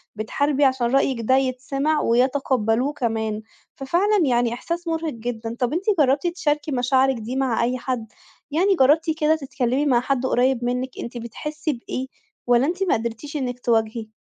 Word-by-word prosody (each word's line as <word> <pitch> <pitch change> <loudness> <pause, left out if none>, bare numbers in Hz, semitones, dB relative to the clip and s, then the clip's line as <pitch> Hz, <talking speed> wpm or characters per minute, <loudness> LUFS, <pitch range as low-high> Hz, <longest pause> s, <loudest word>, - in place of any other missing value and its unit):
بتحاربي 280 +7 +1
عشان 260 -2 +2
رأيِك 265 -2 +2
ده 260 +4 +3
يتسمِع 270 +3 0
ويتقبلوه 255 0 +1
كمان. 220 -5 -2 0.3
ففعلًا 350 +7 +2
يعني 240 -3 +2
إحساس 335 +8 -4
مرهق 325 -1 -2
جدًا. 230 -1 -5
طَب 245 +2 0
أنتِ 345 +4 -1 0.2
جربتِ 280 +3 +3
تشاركي 300 -4 -1
مشاعرِك 260 +1 +2
دي 230 +3 -5
مع 260 -4 +1
أي 250 +2 0
حد؟ 250 -3 -3 0.4
يعني 375 +6 +3
جربتِ 305 +2 +4
كده 310 +1 +3
تتكلمي 270 -2 -1
مع 255 -4 +4
حد 260 0 -1
قريب 255 -1 +2
منِك 250 +1 -1
أنتِ 240 +1 -7
بتحسي 300 +7 -4
بإيه؟ 255 +1 -5 0.4
والّا 245 +1 +4
أنتِ 360 +4 -1
ما 375 - +2
قدْرتيش 235 +6 -4
إنِك 250 -3 -3
تواجهي؟ 225 -2 0
260 Hz, 160 wpm, -23 LUFS, 240-295 Hz, 0.4 s, جربتِ